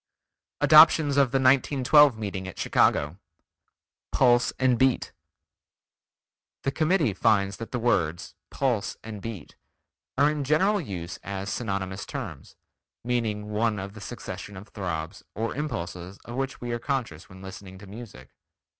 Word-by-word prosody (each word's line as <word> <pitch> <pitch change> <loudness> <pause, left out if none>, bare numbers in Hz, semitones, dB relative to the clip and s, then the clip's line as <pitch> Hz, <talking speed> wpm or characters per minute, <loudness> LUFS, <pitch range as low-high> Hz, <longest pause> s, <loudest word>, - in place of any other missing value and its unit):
ADOPTIONS 155 -1 +7
OF 140 -2 +4
THE 135 - -5
1912 135 0 +4
MEETING 100 -3 -5
AT 95 - -8
CHICAGO 75 +6 +1 0.9
Pulse 120 0 +4
and 130 -3 +2
Beat 130 -1 +2 1.5
The 135 - 0
Committee 155 - +1
finds 100 -2 +2
that 115 - -8
the 125 - -1
words: 90 -8 0 0.2
Pulse 120 -7 -1
and 110 -2 -8
Beat 105 -8 -8 0.6
are 145 +1 +4
in 150 -2 -3
general 190 +9 +2
use 90 - -6
as 100 0 -4
synonymous 100 -4 -4
terms, - - -7 0.5
meaning 110 -4 -2
one 110 0 0
of 100 +1 -6
the 110 - -11
succession 100 -1 -7
of 100 +3 -11
throbs 85 -6 -5
or 115 +3 -2
impulses 90 - -5
of 120 - -8
which 135 0 -3
we 120 0 -5
are 120 - -2
conscious 115 - -3
when 95 +1 -13
listening 95 0 -10
to 100 - -12
music. 100 - -11
110 Hz, 140 wpm, -26 LUFS, 95-135 Hz, 1.5 s, ADOPTIONS